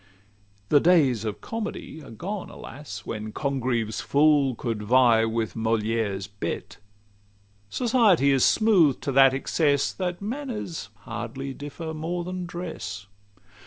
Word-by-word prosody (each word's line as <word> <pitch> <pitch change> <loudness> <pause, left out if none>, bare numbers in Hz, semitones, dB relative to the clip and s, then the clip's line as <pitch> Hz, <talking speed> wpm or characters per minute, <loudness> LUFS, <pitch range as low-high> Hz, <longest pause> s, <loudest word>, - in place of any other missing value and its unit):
The 145 - +6
days 140 - +3
of 105 -2 -4
Comedy 215 -7 -5
are - - -12
gone, 185 - -5
alas! 145 +2 -9
When 110 0 -5
Congreve's 120 -6 -1
fool 140 +1 +3
could 115 -2 -3
vie 115 0 +4
with 115 -1 -2
Molière's 110 -3 -1
bête: 100 0 -5 0.9
Society 220 - +3
is 135 -2 +3
smooth'd 185 - +4
to 140 - -1
that 135 0 +6
excess, 140 0 +1
That 180 -2 -3
manners 215 - -5
hardly 120 +4 -5
differ 155 +4 -7
more 170 +3 -3
than 180 0 -5
dress. 160 - -6
135 Hz, 125 wpm, -25 LUFS, 115-175 Hz, 0.9 s, The